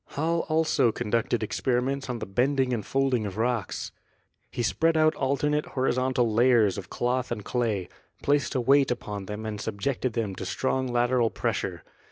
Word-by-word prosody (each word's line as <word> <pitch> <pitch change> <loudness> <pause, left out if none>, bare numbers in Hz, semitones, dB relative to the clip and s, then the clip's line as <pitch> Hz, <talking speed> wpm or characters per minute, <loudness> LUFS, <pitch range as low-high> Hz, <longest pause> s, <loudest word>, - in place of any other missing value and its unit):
Hall 165 +3 0
also 155 -7 +3
conducted 115 0 -1
experiments 130 +4 -1
on 125 - -2
the 110 - -5
bending 130 +5 +1
and 110 -3 -2
folding 135 -5 0
of 100 - -7
rocks. 115 -2 -1 0.6
He 120 - -3
spread 160 +7 +2
out 155 0 +4
alternate 150 +2 0
horizontal 130 -3 +1
layers 115 -5 +4
of 95 - -10
cloth 125 +1 -1
and 105 - -4
clay, 110 -7 -1 0.4
placed 140 -3 +1
a 130 - +2
weight 135 +2 +4
upon 105 -5 -4
them 105 +1 -5
and 105 -2 -4
subjected 115 +4 -2
them 110 -4 -2
to - - -5
strong 130 +4 -1
lateral 120 -1 +2
pressure. - - -3
125 Hz, 165 wpm, -27 LUFS, 110-135 Hz, 0.6 s, out